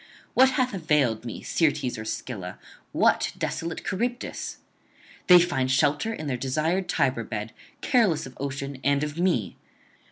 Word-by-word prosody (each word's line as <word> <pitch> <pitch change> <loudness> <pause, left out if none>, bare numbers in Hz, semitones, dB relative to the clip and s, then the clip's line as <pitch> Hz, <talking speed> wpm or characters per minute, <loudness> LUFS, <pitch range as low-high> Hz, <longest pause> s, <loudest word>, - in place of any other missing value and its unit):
What 260 +1 +6
hath 255 -3 +1
availed 150 - +1
me 115 - -6
Syrtes 145 -6 +1
or 110 - -6
Scylla, 110 -4 -5 0.3
what - - +2
desolate 165 0 -3
Charybdis? 240 +6 -3 0.7
they 180 - +10
find 150 -7 +1
shelter 145 +9 +2
in 155 -8 -5
their 130 -4 -1
desired 155 +9 -1
Tiber 130 -5 +1
bed, 105 0 -5 0.3
careless 220 - +2
of 130 - -11
ocean 140 0 -4
and 140 +1 +2
of 150 +2 -4
me. 175 - 0
145 Hz, 140 wpm, -26 LUFS, 130-175 Hz, 0.7 s, they